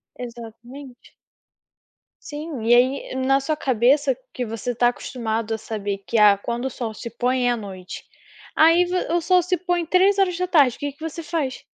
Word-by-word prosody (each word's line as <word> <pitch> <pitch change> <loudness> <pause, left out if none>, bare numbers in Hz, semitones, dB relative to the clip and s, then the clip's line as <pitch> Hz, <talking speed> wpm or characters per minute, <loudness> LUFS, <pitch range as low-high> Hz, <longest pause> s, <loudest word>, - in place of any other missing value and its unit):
Exatamente. 245 +2 -11 1.1
Sim, 295 -5 -7
e 235 +1 +4
aí, 260 +1 +1
na 270 +1 +2
sua 305 +3 -2
cabeça 265 +1 +2 0.2
que 250 - -3
você 225 +2 -4
tá 240 +1 +3
acostumado 225 -3 -4
a - - -2
saber 205 -2 -4
que: 230 - -1
"Ah, 205 -2 +6
quando 235 +5 -4
o - - 0
sol 230 -3 -5
se 235 - -7
põe 245 +1 0
é - - +3
à 240 - -1
noite". 190 -3 -8 0.5
Aí 330 +3 +5
vo 360 +1 -2 0.2
o 345 - +1
sol 360 +2 +3
se 365 +1 0
põe 350 -1 -1
15h, 365 -7 +3
que 285 0 -3
que - - -32
você 325 +1 -6
faz? 300 -6 -3
260 Hz, 175 wpm, -22 LUFS, 230-320 Hz, 1.1 s, Ah